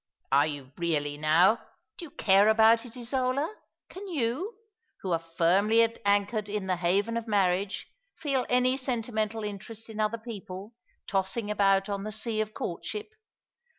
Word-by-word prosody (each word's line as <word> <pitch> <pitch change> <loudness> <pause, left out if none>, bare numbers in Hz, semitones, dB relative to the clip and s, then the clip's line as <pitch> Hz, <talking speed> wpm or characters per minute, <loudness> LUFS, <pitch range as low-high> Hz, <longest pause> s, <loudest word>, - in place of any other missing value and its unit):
"Are 140 +2 +5
you 140 -3 -6
really, 150 -4 0
now? 165 +8 +4 0.4
Do 345 - -6
you - - -11
care 200 -4 +4
about 225 +2 +5
it, 240 +2 -12
Isola? 255 - -1 0.3
Can 395 +2 -9
you, 310 - -2 0.5
who 190 - -3
are 165 - +2
firmly 180 +7 +3 0.2
anchored 205 +1 +1
in 205 -1 -2
the 185 -1 0
haven 195 +6 +1
of 230 0 -4
marriage, 195 -1 +1 0.3
feel 275 -4 -1
any 250 +1 +3
sentimental 225 -4 -2
interest 215 +2 -7
in 220 - -8
other 215 +1 +1
people, 210 -2 -8 0.3
tossing 200 +3 -1
about 195 -1 +3
on 200 -1 -3
the 215 - -4
sea 215 0 -2
of 215 0 -3
courtship? 425 - -5
215 Hz, 150 wpm, -28 LUFS, 190-235 Hz, 0.5 s, Are